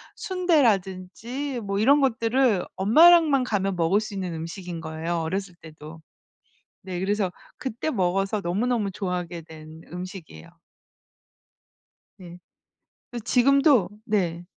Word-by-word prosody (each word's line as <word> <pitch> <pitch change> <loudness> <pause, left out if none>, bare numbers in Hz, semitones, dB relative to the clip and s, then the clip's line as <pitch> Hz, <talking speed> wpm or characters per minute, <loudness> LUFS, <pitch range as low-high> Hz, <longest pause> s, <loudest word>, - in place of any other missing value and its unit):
순대라든지 255 - -1
뭐 200 -1 -2
이런 280 +7 +5
것들을 245 -5 +2
엄마랑만 305 - +6
가면 195 -5 -1
먹을 175 +4 +2
수 215 -1 -6
있는 185 -3 -4
음식인 165 +1 -6
거예요, 160 +2 -4
어렸을 185 +2 -4
때도. 155 -1 -12 0.8
네 185 -2 -5
그래서 195 -1 0 0.3
그때 265 0 -4
먹어서 195 0 0
너무너무 210 +4 -1
좋아하게 180 -3 -4
된 160 0 -13
음식이에요. 180 -1 -9 1.7
네. 175 -1 -12 0.7
그래서 240 -3 -7
지금도 270 - +4 0.2
네. 175 -6 -1
195 Hz, 265 characters per minute, -25 LUFS, 175-245 Hz, 1.7 s, 엄마랑만